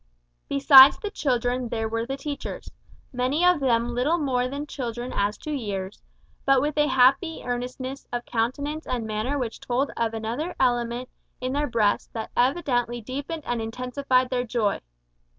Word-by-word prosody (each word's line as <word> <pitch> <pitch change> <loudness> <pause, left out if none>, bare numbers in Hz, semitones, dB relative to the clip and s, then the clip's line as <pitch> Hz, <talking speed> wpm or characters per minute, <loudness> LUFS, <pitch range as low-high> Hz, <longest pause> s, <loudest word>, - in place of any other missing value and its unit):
Besides 275 -1 +8
the 415 - -5
children 250 - -1
there 225 -1 -2
were 230 +1 -2
the 270 +1 -3
teachers 285 0 -6 0.4
many 260 +7 +1
of 360 -3 +5
them 240 -3 +1
little 270 +8 +1
more 255 -5 0
than 280 +3 -5
children 245 -3 -5
as 205 +1 0
to 305 - -7
years, 200 -8 -4 0.4
but 275 -1 +4
with 295 +3 -1
a 295 0 +3
happy 270 +5 +3
earnestness 250 +2 -4
of 240 0 -3
countenance 285 +7 -2
and 240 -3 -2
manner 220 +6 -2
which 245 -4 -4
told 255 +3 -1
of 225 -1 -1
another 235 +11 -3
element 240 -1 0 0.3
in 255 +1 -3
their 290 +1 0
breasts 225 -5 +1
that 225 -1 -5
evidently 245 -3 +1
deepened 280 +7 -5
and 240 -1 -2
intensified 255 +2 0
their 250 -1 0
joy. 230 -4 -1
250 Hz, 160 wpm, -25 LUFS, 235-280 Hz, 0.4 s, Besides